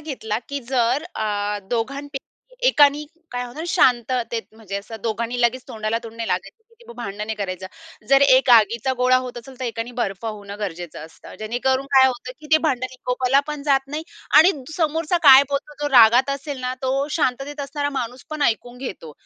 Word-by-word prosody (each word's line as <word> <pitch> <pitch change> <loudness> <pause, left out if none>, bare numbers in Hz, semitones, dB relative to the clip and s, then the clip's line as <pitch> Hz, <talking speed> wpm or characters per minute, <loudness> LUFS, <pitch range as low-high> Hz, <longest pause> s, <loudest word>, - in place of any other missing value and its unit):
घेतला 240 -8 -4
की 280 0 -4
जर 255 +2 +1
अ, 205 -1 -2
दोघांपैकी 275 +4 -3 0.4
एकाने 295 - +4 0.3
काय 245 0 -3
होतं 300 +7 -7
शांततेत 240 -3 +1
म्हणजे 200 -3 -6
असं 215 +3 -7
दोघांनी 235 +2 -2
लगेच 245 +2 +1
तोंडाला 220 +1 -2
तोंड 230 0 -10
लागायचं 195 - -3
की 465 0 -22
ते - - -11
भांडणे 210 -1 -5
करायचं 190 -2 -5 0.4
जर 275 0 +6
एक 260 -1 +5
आगीचा 230 +3 +4
गोळा 255 0 +4
होत 255 -1 -4
असेल 260 +2 -13
तर - - -2
एकाने 230 +1 -4
बर्फ 195 0 -3
होणं 205 -2 -6
गरजेचं 175 -5 -6
असतं. 160 - -14
जेणेकरून 260 +5 -1
काय 265 0 +8
होतं 255 0 -4
की 305 - -12
ते 315 - +7
भांडण 255 -5 0
विकोपाला 255 +1 +1
पण 300 -2 -5
जात 275 -2 +3
नाही 300 +3 -5 0.4
आणि 355 +5 +7 0.2
समोरचा 325 +1 0
काय 275 -2 +9
बोलतो, 285 +1 -3
जो 290 - +1
रागात 245 +3 +7
असेल 280 0 -4
ना 255 0 -2
तो 270 +2 0
शांततेत 285 +2 -1
असणारा 285 +1 -3
माणूस 245 +1 -6
पण 305 -1 -3
ऐकून 245 0 -1
घेतो. 185 - -7
250 Hz, 180 wpm, -22 LUFS, 225-275 Hz, 0.4 s, काय